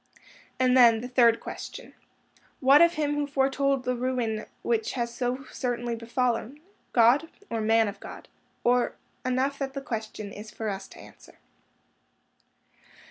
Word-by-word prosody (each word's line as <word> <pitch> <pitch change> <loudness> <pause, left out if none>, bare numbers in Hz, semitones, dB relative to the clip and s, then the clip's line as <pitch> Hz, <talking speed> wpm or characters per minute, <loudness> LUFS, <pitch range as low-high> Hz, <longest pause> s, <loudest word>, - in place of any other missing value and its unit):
And 255 0 +4
then 235 -3 +6
the 245 - -5
third 240 -2 +4
question, - - -8 0.7
What 275 +3 +6
of 340 0 +5
him 295 -1 0
who 295 0 -1
foretold 275 -1 +1
the 250 0 -1
ruin 240 -3 -2 0.2
which 225 -2 0
has 235 -2 -2
so 255 +2 -2
certainly 240 -2 -2
befallen? 235 +3 -2 0.3
God? 245 +7 +4 0.2
Or 225 -1 -1
man 225 0 +3
of 205 - -6
God? - - -10 0.4
Or—enough 255 +2 -1
that 270 -1 -3
the - - -2
question 220 -5 -5
is 210 +1 -9
for 220 0 -4
us 195 -1 -5
to - - -15
answer. - - -16
245 Hz, 140 wpm, -27 LUFS, 230-270 Hz, 0.7 s, then